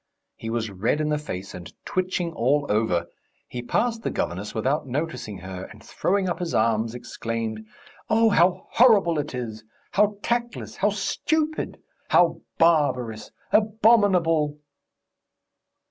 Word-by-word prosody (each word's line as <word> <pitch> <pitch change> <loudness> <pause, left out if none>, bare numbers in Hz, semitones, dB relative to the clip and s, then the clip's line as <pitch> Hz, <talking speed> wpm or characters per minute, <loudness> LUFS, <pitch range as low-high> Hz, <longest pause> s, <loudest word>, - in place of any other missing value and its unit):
He 115 - -6
was 115 -2 -2
red 105 +10 0
in 155 0 0
the 150 -1 +1
face 95 -10 -6
and 90 0 -9
twitching 180 -2 -1
all 145 +3 +2
over. 105 -5 +1 0.4
He 125 - -5
passed 230 - 0
the - - -2
governess 95 +5 -3
without 135 +7 0
noticing 125 -6 -3
her, 95 +1 -7
and 110 -1 -14
throwing 190 +1 0
up 175 - -2
his 175 -2 -2
arms, 110 +1 +1
exclaimed: 115 -2 -4 0.5
"Oh, 225 0 +4
how 180 0 +3
horrible 200 -10 +5
it 145 -2 -4
is! 110 -3 -5 0.3
How 205 0 +2
tactless! 240 0 -2
How 205 - +2
stupid! 310 +10 -1 0.3
How 170 -1 +4 0.2
barbarous! 130 -9 +2 0.2
Abominable!" 200 -9 +3
150 Hz, 130 wpm, -25 LUFS, -, 0.5 s, horrible